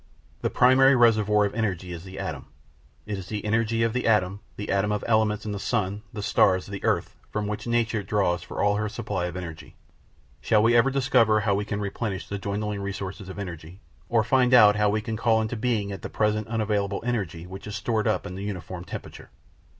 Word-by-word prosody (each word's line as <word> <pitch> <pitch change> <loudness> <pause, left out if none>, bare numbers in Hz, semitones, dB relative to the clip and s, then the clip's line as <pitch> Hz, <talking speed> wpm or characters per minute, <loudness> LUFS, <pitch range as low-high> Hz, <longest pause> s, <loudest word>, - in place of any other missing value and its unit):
The - - 0
primary 135 +2 +5
reservoir 105 -3 +4
of 100 - -3
energy 95 -6 -2
is 85 -1 -7
the 95 0 -10
atom; - - -5 0.6
it 105 -2 -4
is 95 - -9
the 105 0 -4
energy 115 +1 +1
of 115 -1 +1
the 125 -1 -1
atom, 100 -3 +2 0.2
the 105 - -4
atom 100 +1 +1
of 105 -1 -1
elements 110 -2 +1
in 105 - -3
the 100 - -4
sun, 100 +1 -1
the 105 -1 -6
stars, 95 -3 +3
the 100 -1 -7
earth, - - 0
from 105 0 -2
which 105 +3 -4
nature 115 -2 +1
draws 95 -3 0
for - - -4
all 105 0 +3
her 105 0 -1
supply 105 -5 -3
of 90 +1 -6
energy. 80 -3 -8 0.7
Shall 105 - +3
we 120 +1 +4
ever 120 +3 +5
discover 120 -5 +3
how 100 -2 +1
we 100 +1 -1
can 105 -1 -3
replenish 100 -1 -3
the 100 - -4
dwindling 105 +1 -3
resources 100 -1 -5
of 95 - -8
energy, 90 -2 -7 0.3
or 115 -2 +3
find 125 +1 +4
out 105 -4 +8
how 105 -1 +2
we 105 +1 0
can 110 0 -4
call 115 0 +3
into 110 +2 -2
being 110 -3 -1
the - - -4
at 95 - -7
present 110 0 +1
unavailable 105 -3 -1
energy 95 -9 -2
which 95 +3 -9
is 105 - -5
stored 110 -2 -1
up 110 - 0
in 90 - -6
uniform 95 -3 -5
temperature? - - -9
105 Hz, 210 wpm, -26 LUFS, 100-110 Hz, 0.7 s, out